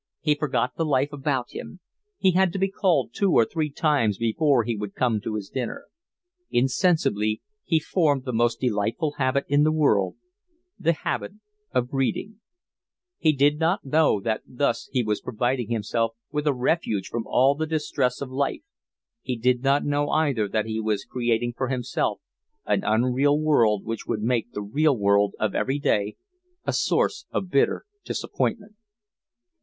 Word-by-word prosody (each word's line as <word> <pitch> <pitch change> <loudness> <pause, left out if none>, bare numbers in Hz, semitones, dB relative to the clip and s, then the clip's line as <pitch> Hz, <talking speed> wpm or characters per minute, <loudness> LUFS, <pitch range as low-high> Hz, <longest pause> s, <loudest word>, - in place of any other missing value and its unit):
He 150 -1 +3
forgot 125 -5 -1
the 165 - -1
life 145 -1 +1
about 135 -3 -2
him. 185 - -8 0.4
He 190 - +3
had 185 0 +3
to - - -2
be 195 0 0
called 155 - +1
two 200 -2 +1
or 115 - +5
three 155 +4 -2
times 140 - +1
before 120 +3 +2
he 115 +1 -2
would 105 -1 -6
come 115 -4 +1
to 110 0 -4
his 105 -2 -4
dinner. 125 -3 -5 0.6
Insensibly 120 - +1 0.2
he 165 -4 +2
formed 150 -5 +1
the 125 - -3
most 120 +1 +1
delightful 120 - 0
habit 130 +1 +1
in 145 +1 +3
the 155 +1 +4
world, 125 -12 +2 0.6
the 165 +1 +2
habit 170 - -3 0.4
of 125 -1 0
reading: 195 - -1 0.8
he 155 - +4
did 145 +1 +2
not 170 +2 +1
know 150 -5 +3
that 110 +2 -2
thus 125 -2 -1
he 130 -3 +1
was 105 -1 -1
providing 125 0 -1
himself 115 0 -1 0.2
with 150 0 -2
a - - +5
refuge 125 - 0
from 115 -1 -4
all 135 +2 +4
the 160 +2 -3
distress 145 -5 -1
of 135 -2 -5
life; 140 - -1 0.6
he 125 - -3
did 125 +1 +2
not 140 +2 +2
know 145 0 0
either 140 -9 +1
that 105 +1 -1
he 110 0 -3
was 105 -2 -1
creating 120 -1 -1
for 130 - -2
himself 125 -1 -1 0.5
an - - +1
unreal 130 +6 +2
world 115 -10 +3
which 115 0 -5
would 105 - -2
make 120 0 0
the 105 - -5
real 140 +6 +2
world 100 0 +2
of 110 - 0
every 135 +2 0
day 105 -7 0 0.5
a - - 0
source 415 - 0
of 185 -2 -3
bitter 140 - +2 0.2
disappointment. 210 -2 -3
130 Hz, 170 wpm, -25 LUFS, 115-150 Hz, 0.8 s, or